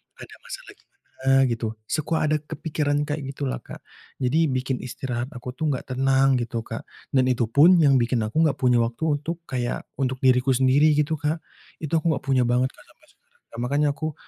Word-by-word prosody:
ada -, -, -12 dB
masalah -, -, -9 dB
gimana -, -, -31 dB, 0.6 s
gitu, 115 Hz, -1 st, -2 dB, 0.2 s
suka 155 Hz, +1 st, -1 dB
ada 155 Hz, -, +2 dB
kepikiran 150 Hz, -1 st, -2 dB
kayak 145 Hz, -2 st, -4 dB
gitulah 135 Hz, -1 st, -3 dB
Kak -, -, -11 dB, 0.4 s
jadi 155 Hz, +6 st, +2 dB
bikin 130 Hz, 0 st, -1 dB
istirahat 125 Hz, 0 st, -4 dB
aku 125 Hz, +1 st, -8 dB
tuh 155 Hz, -, -2 dB
gak 130 Hz, -, -6 dB
tenang 135 Hz, 0 st, +3 dB
gitu 115 Hz, -1 st, -3 dB
Kak, 115 Hz, 0 st, -7 dB, 0.2 s
dan 130 Hz, -2 st, +2 dB
itu 120 Hz, -3 st, +1 dB
pun 150 Hz, +9 st, +6 dB
yang 140 Hz, -3 st, +5 dB
bikin 120 Hz, -1 st, +1 dB
aku 115 Hz, +10 st, +1 dB
gak 145 Hz, -, +2 dB
punya 125 Hz, -2 st, +4 dB
waktu 125 Hz, +6 st, 0 dB
untuk 165 Hz, +3 st, -5 dB
kayak 125 Hz, -3 st, -3 dB
untuk 130 Hz, -1 st, -2 dB
diriku 130 Hz, 0 st, +4 dB
sendiri 135 Hz, +4 st, +4 dB
gitu 150 Hz, +2 st, +1 dB
Kak, 155 Hz, +2 st, -2 dB, 0.4 s
itu 155 Hz, -, -4 dB
aku 160 Hz, 0 st, +1 dB
gak 140 Hz, -, -4 dB
punya 130 Hz, -2 st, +2 dB
banget 125 Hz, +2 st, +2 dB
Kak -, -, -19 dB
sampai 310 Hz, -, -25 dB
sekarang. 480 Hz, -, -20 dB
Makanya 145 Hz, +3 st, +1 dB
aku 155 Hz, -1 st, -3 dB
135 Hz, 190 wpm, -24 LUFS, 125-150 Hz, 0.6 s, pun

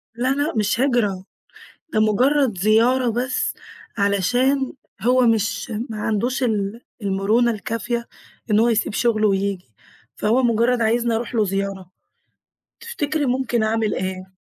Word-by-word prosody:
لأ، 245 Hz, +2 st, 0 dB
لأ، 285 Hz, +2 st, -1 dB
مش 215 Hz, +1 st, 0 dB
هجرة 235 Hz, -8 st, +1 dB, 0.7 s
ده 215 Hz, -, +2 dB
مجرد 245 Hz, +2 st, +2 dB
زيارة 230 Hz, +5 st, +3 dB
بس، 250 Hz, +3 st, -1 dB, 0.4 s
علشان 245 Hz, +8 st, +1 dB, 0.3 s
هو 250 Hz, +1 st, +3 dB
مش 225 Hz, 0 st, 0 dB, 0.2 s
ما 215 Hz, -1 st, -5 dB
عندوش 245 Hz, +6 st, -1 dB
ال 215 Hz, -2 st, -1 dB, 0.2 s
المرونة 205 Hz, +5 st, +2 dB
الكافية 235 Hz, +2 st, -3 dB, 0.4 s
إن 210 Hz, +1 st, +4 dB
هو 235 Hz, -, +4 dB
يسيب 225 Hz, -2 st, +1 dB
شغله 215 Hz, -1 st, +2 dB
وييجي، 195 Hz, -, -2 dB, 0.4 s
فهو 230 Hz, +5 st, +2 dB
مجرد 235 Hz, +1 st, +2 dB
عايزني 235 Hz, +1 st, +1 dB
أروح 235 Hz, +2 st, -3 dB
له 220 Hz, -2 st, +3 dB
زيارة، 195 Hz, -1 st, -3 dB, 0.9 s
تفتكري 315 Hz, -11 st, -2 dB
ممكن 245 Hz, -2 st, 0 dB
أعمل 220 Hz, -1 st, 0 dB
إيه؟ 185 Hz, 0 st, -4 dB
225 Hz, 130 wpm, -21 LUFS, 205-250 Hz, 0.9 s, إن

